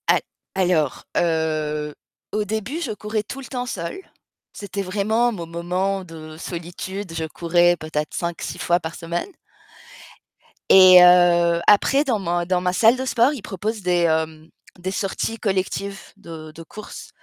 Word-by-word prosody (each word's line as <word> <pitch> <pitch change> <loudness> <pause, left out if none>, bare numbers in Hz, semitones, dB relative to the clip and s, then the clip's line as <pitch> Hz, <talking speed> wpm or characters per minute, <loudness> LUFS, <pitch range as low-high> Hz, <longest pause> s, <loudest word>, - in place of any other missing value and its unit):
A - - +5 0.4
alors, 175 -7 +1
heu, 155 -2 0 0.4
au 210 - +1
début, 220 +10 -3
je 260 - -2
courais 210 0 -3
tout 255 +5 -8
le 270 - -8
temps 250 -1 -4
seule. 175 - -5 0.5
C'était 200 -1 -5
vraiment 210 +5 +1
mon 175 -7 -6
moment 180 +3 -2
de 160 -2 -10
solitude, 175 +2 -6
je 165 -1 -3
courais 175 +2 +2
peut-être 155 -1 -4
5-6 170 -1 -4
fois 175 0 +2
par 165 -1 -6
semaine 170 - -4 1.4
et 185 -1 +9
heu, 175 -1 +5
après 270 +7 +5
dans 250 -7 0
ma 175 -2 -1
dans 180 0 0
ma 180 0 0
salle 225 +5 +5
de 260 0 -4
sport, 250 +2 +3
ils 275 - -7
proposent 210 +4 -4
des, 180 -1 +1
hem, 160 -1 0 0.3
des 185 +2 -3
sorties 195 +3 -2
collectives 195 -1 -2 0.2
de 165 -5 -10
de 165 +2 -11
courses 210 +6 -10
180 Hz, 155 wpm, -22 LUFS, 170-210 Hz, 1.4 s, et